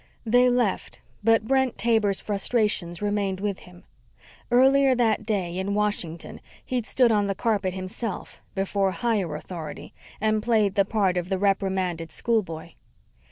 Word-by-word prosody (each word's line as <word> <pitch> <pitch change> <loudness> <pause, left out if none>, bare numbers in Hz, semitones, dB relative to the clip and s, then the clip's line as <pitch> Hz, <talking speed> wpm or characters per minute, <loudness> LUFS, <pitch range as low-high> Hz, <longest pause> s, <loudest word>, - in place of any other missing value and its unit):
They 245 +2 +4
left, 245 -5 -1 0.2
but 225 0 +3
Brent 265 0 +1
Taber's 220 -4 +2
frustrations 205 -4 0
remained 205 -2 -1
with 200 -1 -2
him. 180 0 -16 0.7
Earlier 265 +2 +5
that 220 -3 +1
day, 185 -6 -1
in 200 +2 -2
Washington, 205 -6 -2 0.2
he'd 245 -3 -2
stood 250 -3 +3
on 205 -2 +2
the 195 - -1
carpet 195 -3 0
himself, 190 +2 -5
before 195 0 0
higher 200 -7 -1
authority, 155 -1 -8 0.3
and 215 0 +1
played 215 -3 +2
the 200 -1 +3
part 195 -4 +1
of 175 0 -2
the 190 - 0
reprimanded 190 -4 0
schoolboy. 170 -4 -2
205 Hz, 140 wpm, -25 LUFS, 185-225 Hz, 0.7 s, Earlier